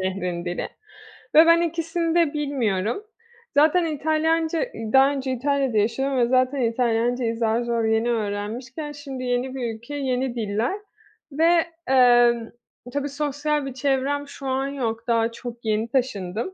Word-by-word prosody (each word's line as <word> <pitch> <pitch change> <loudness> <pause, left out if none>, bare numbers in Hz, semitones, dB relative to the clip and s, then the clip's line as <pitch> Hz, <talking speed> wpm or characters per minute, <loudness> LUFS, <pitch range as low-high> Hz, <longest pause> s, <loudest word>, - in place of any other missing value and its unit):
şehrin 180 -2 -3
dili 175 0 -3 0.7
ve 320 +2 +9
ben 335 0 +5
ikisini 330 0 -1
de 335 -4 +3
bilmiyorum. 250 - -1 0.5
Zaten 315 +4 +4
İtalyanca 320 - 0 0.3
daha 270 +1 +7
önce 270 -2 -3
İtalya'da 270 -2 0
yaşıyordum 260 +6 0
ve 240 -1 +3
zaten 255 +2 +2
İtalyancayı 235 0 0
zar 225 0 +1
zor 235 -1 -1
yeni 220 +1 +1
öğrenmişken; 230 +7 -4
şimdi 275 -3 -7
yeni 250 +1 -1
bir 240 -4 -3
ülke, 235 +6 -9
yeni 260 -2 -1
diller 225 - -1 0.5
ve, 330 +3 +3 0.2
emm, 240 -3 +4 0.4
tabii 285 0 -2
sosyal 290 0 -1
bir 270 - -5
çevrem 275 +2 -1
şu 280 -1 -8
an 265 +1 0
yok. 230 -5 -3
Daha 230 -1 +2
çok 235 0 -9
yeni 215 +1 0
taşındım. 230 - -2
260 Hz, 140 wpm, -23 LUFS, 230-290 Hz, 0.7 s, ve